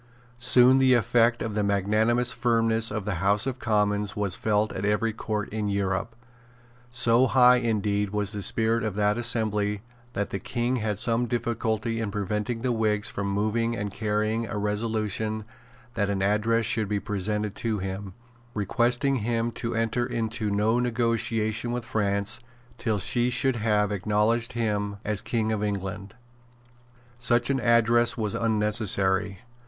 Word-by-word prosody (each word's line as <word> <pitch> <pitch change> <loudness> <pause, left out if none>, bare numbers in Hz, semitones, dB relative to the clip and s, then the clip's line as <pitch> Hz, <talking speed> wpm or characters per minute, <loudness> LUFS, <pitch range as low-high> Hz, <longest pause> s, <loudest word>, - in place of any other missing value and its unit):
Soon 125 +1 +6
the 130 -1 +5
effect 120 0 +2
of 110 - -4
the 105 - 0
magnanimous 105 +5 +1
firmness 115 -2 +2
of 105 -2 -4
the 100 -6 -2
House 100 +2 +3
of 130 -1 -3
Commons 105 -2 0
was 100 -3 -1
felt 105 0 0
at 95 - -5
every 105 +2 0
Court 105 -1 -3
in 105 -1 -3
Europe. 100 +2 -2 0.7
So 120 +1 +3
high 125 -1 +6
indeed 105 -4 0
was 105 -1 -1
the 105 - -4
spirit 115 +3 +1
of 110 -3 -3
that 105 +2 +1
assembly 105 -3 0 0.3
that 100 -3 -3
the 95 - -3
King 120 +6 -2
had 105 -3 -2
some 115 +3 +2
difficulty 115 -1 -2
in 110 -2 -2
preventing 105 +4 -3
the 130 - +1
Whigs 110 -3 +1
from 100 0 -3
moving 110 +4 0
and 105 -2 -4
carrying 110 +2 -1
a 105 - -4
resolution 110 0 -2 0.5
that 100 -3 -1
an 95 -1 -1
address 110 +3 +1
should 110 -1 0
be 105 -1 0
presented 105 0 -2
to 115 -2 -2
him, 95 0 -6 0.4
requesting 120 +6 +1
him 115 +1 -1
to 115 0 -4
enter 115 +2 0
into 115 -2 -2
no 105 +4 +1
negotiation 115 -1 0
with 120 -1 -3
France, 100 -3 -1 0.4
till 110 -3 0
she 120 +5 +1
should 125 +1 +1
have 105 -2 +1
acknowledged 105 +4 0
him 105 -3 -1
as 105 -1 -1
King 110 -2 -1
of 105 -1 -1
England. 100 0 -4 1.0
Such 120 +2 +2
an 135 - 0
address 120 +1 +3
was 105 -3 -1
unnecessary. 105 -3 0
110 Hz, 155 wpm, -26 LUFS, 105-115 Hz, 1.0 s, Soon